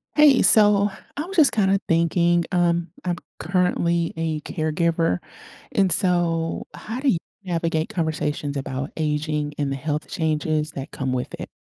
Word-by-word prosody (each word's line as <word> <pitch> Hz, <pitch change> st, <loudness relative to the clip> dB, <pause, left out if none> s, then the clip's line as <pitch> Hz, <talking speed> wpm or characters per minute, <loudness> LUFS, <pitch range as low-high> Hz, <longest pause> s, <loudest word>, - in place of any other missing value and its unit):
Hey, 295 Hz, -3 st, +6 dB
so, 205 Hz, -2 st, +6 dB, 0.3 s
I -, -, -1 dB
was 385 Hz, +2 st, -7 dB
just 305 Hz, -4 st, +6 dB
kinda 195 Hz, -2 st, +2 dB
thinking, 170 Hz, +1 st, +2 dB
um, 170 Hz, -2 st, +1 dB
I'm 175 Hz, -1 st, 0 dB, 0.2 s
currently 170 Hz, -1 st, 0 dB
a 160 Hz, -2 st, -2 dB
caregiver, 160 Hz, -, 0 dB, 0.5 s
and 195 Hz, -2 st, +2 dB
so, 170 Hz, -2 st, +1 dB
how 225 Hz, +4 st, -6 dB
do 275 Hz, +1 st, +1 dB
y 180 Hz, -, +3 dB, 0.3 s
navigate 165 Hz, -2 st, -1 dB
conversations 150 Hz, -3 st, -2 dB
about 135 Hz, +1 st, -4 dB
aging 150 Hz, -1 st, -1 dB
and 145 Hz, -2 st, -1 dB
the -, -, -1 dB
health 150 Hz, +2 st, -3 dB
changes 155 Hz, -1 st, -1 dB
that 135 Hz, -2 st, -7 dB
come 130 Hz, -1 st, -3 dB
with 125 Hz, -1 st, -3 dB
it? -, -, -6 dB
165 Hz, 150 wpm, -23 LUFS, 150-180 Hz, 0.5 s, Hey